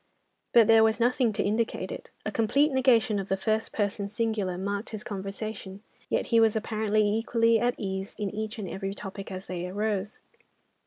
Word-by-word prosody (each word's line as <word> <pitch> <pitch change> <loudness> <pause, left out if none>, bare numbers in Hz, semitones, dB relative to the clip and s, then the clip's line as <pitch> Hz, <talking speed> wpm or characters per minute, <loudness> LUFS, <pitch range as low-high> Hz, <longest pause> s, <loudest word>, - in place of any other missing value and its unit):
But 230 -2 +7
there 225 +1 +6
was 220 +1 +2
nothing 245 0 +2
to - - 0
indicate 220 +3 -1
it. - - -8 0.2
A - - -1
complete 275 +7 +2
negation 240 -5 +3
of 195 - -5
the 195 - +1
first 220 +3 -1
person 200 -1 -1
singular 210 -4 -1
marked 200 +3 -3
his 215 -2 -6
conversation, 195 0 -6 0.3
yet - - 0
he 230 - +7
was 225 -1 +4
apparently 215 -1 +1
equally 230 +1 +2
at 240 +2 +1
ease 190 -1 -4
in 205 -3 -2
each 215 +1 -4
and 205 -3 -5
every 195 +2 -4
topic 195 0 -7
as 185 0 -6
they 180 -1 -4
arose. 205 +1 -2
215 Hz, 180 wpm, -28 LUFS, 195-225 Hz, 0.3 s, But